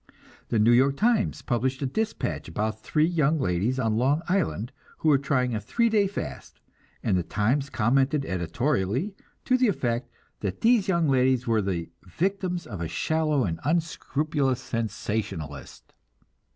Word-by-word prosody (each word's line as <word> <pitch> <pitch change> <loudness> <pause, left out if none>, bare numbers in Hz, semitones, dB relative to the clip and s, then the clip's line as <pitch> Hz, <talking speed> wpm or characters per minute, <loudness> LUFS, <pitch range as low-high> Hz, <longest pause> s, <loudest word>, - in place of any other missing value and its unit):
The 115 - +1
New 110 +2 +5
York 135 +3 +4
Times 230 -1 +1
published 130 +3 -1
a - - +1
dispatch 220 +12 -2
about 110 +5 -3
three 155 +6 +2
young 160 -2 +2
ladies 100 +4 0
on 115 -4 +1
Long 140 +7 +2
Island 120 - 0 0.3
who 160 - +1
were 140 -3 +5
trying 130 -3 0
a 110 - -2
three 230 - +1
day 210 -3 +3
fast, 75 - -7 0.4
and 100 - +2
the 90 - +2
Times 120 - 0
commented 135 +4 +2
editorially 120 - -1 0.3
to 255 0 +3
the 250 - +4
effect 120 - -1 0.3
that 100 -3 -4
these 225 -3 +4
young 170 -4 +2
ladies 130 -2 +3
were 115 -2 +2
"the 85 -4 -3
victims 180 - -2
of 100 -7 -7
a 85 - -2
shallow 155 - 0
and 85 -5 -2
unscrupulous 150 -3 0
sensationalist." 105 - -4
130 Hz, 150 wpm, -26 LUFS, 105-160 Hz, 0.4 s, New